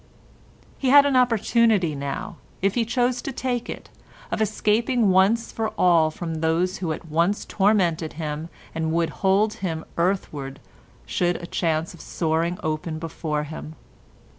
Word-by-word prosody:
He 265 - +1
had 285 +1 +8
an 280 -2 +2
opportunity 230 -7 +3
now, 140 -1 -5 0.2
if 195 +1 +1
he 235 -1 +1
chose 245 +1 0
to - - -4
take 245 -2 -3
it, - - -8 0.4
of - - -1
escaping 220 +1 +2
once 195 +5 +3
for 220 -1 -2
all 170 -3 +4
from 160 0 -5
those 170 +3 +1
who 170 -4 -2
at 155 - -5
once 170 +6 +1
tormented 185 -6 +1
him 155 +1 -4 0.2
and 160 -1 -1
would 165 -1 +1
hold 200 +3 +3
him 165 -4 -3
earthward 155 -7 -1 0.5
should 175 0 0
a 170 - -6
chance 165 -1 -1
of 170 - -12
soaring 165 +1 -1
open 155 +1 -2
before 155 -2 -3
him. 155 +1 -8
175 Hz, 150 wpm, -24 LUFS, 160-220 Hz, 0.5 s, had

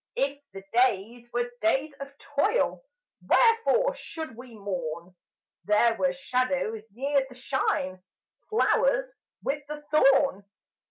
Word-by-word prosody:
If 280 +1 -1
the 195 0 -9
days 240 0 +1
were 240 0 -1
days 270 +7 +1
of 275 0 -9
toil 290 +15 0 0.4
Wherefore 470 +2 +4
should 320 - -7
we 245 0 -11
mourn; 180 -4 -5 0.5
There 210 +3 +4
were 270 +4 +1
shadows 255 -4 -1
near 275 +5 +1
the 250 - -13
shine, 185 -8 -1 0.5
Flowers - - +2 0.3
with 290 +2 -1
the 300 0 -7
thorn? 275 -8 +4
265 Hz, 115 wpm, -27 LUFS, 220-290 Hz, 0.5 s, Wherefore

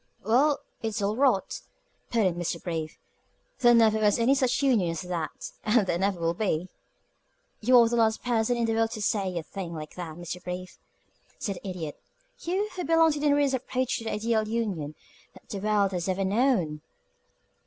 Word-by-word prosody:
"Well, 275 +7 +3 0.2
it's 225 -1 -2
all 205 +1 0
rot!" 250 -6 +1 0.5
put 230 -3 +2
in 185 - +2
Mr. 175 0 -3
Brief. 160 -3 -4 0.6
"There 240 -1 +6
never 220 -2 +4
was 210 -1 +3
any 240 +3 +4
such 265 0 +1
union 230 -11 +3
as 165 0 -4
that, 175 -3 -5
and 215 -1 +3
there 170 -2 -1
never 195 -1 0
will 165 0 +1
be." 180 -2 -1 0.9
"You 250 +3 +5
are 235 -1 +7
the 235 +1 0
last 220 -1 +2
person 240 0 +1
in 235 - +1
the 225 - 0
world 225 0 +2
to 215 - -5
say 195 -4 0
a 165 - -3
thing 170 0 -6
like 155 -1 -7
that, 170 -3 -7
Mr. 175 +1 -7
Brief," 180 0 -6 0.6
said 200 -4 -3
the 200 - -9
Idiot 165 -5 -6 0.4
"you, 380 +5 -1
who 360 - -3
belong 325 -1 +4
to 295 - -3
the 295 - +1
nearest 285 -1 +3
approach 255 0 -1
to 225 - -9
the - - -2
ideal 220 0 0
union 200 -10 -2 0.4
that - - -17
the 200 - -4
world 205 -1 +2
has 180 0 -2
ever 190 +1 0
known!" 190 - +1
215 Hz, 195 wpm, -27 LUFS, 180-240 Hz, 0.9 s, are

